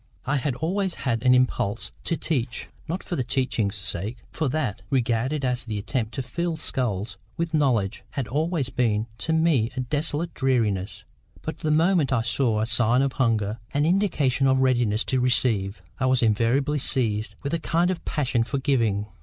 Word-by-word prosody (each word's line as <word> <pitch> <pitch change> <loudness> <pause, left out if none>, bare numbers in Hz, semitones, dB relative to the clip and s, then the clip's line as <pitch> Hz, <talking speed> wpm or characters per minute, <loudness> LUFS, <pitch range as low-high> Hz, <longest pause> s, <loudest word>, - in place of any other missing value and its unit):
I 135 +3 +1
had 135 -1 -1
always 185 +6 -1
had 115 -4 -1
an 125 +1 +5
impulse 115 -4 0
to 165 - 0
teach; 125 -7 -2 0.2
not 175 +4 -3
for 175 - -4
the 130 - 0
teaching's 120 -5 0
sake, 100 +4 -3
for 155 -4 -1
that, 125 -9 -2
regarded 130 +3 0
as 125 -1 -1
the 110 -3 -4
attempt 110 +2 -3
to 135 - -2
fill 170 +5 -2
skulls 105 -9 -1 0.2
with 170 0 -2
knowledge, 125 -10 +1
had 135 -5 -3
always 155 -1 -1
been 110 -4 +1
to 160 - -2
me 160 -8 +3
a 130 - -1
desolate 150 +5 -2
dreariness; 105 -7 0 0.4
but - - -5
the 155 - -1
moment 160 -1 +3
I 120 -4 +2
saw 115 -2 +1
a - - +1
sign 120 +3 +3
of 135 -1 0
hunger, 110 -2 +1 0.2
an 145 +1 +3
indication 155 -8 +2
of 130 0 +3
readiness 120 -4 +2
to 130 -1 0
receive, 115 -5 +1 0.2
I 130 - +1
was 130 -1 +3
invariably 120 +7 +2
seized 110 -5 +1
with 140 - -3
a 170 - +1
kind 170 +3 +1
of 180 - -5
passion 130 -6 0
for 130 +4 -3
giving. 115 -7 +1
130 Hz, 180 wpm, -25 LUFS, 115-150 Hz, 0.4 s, an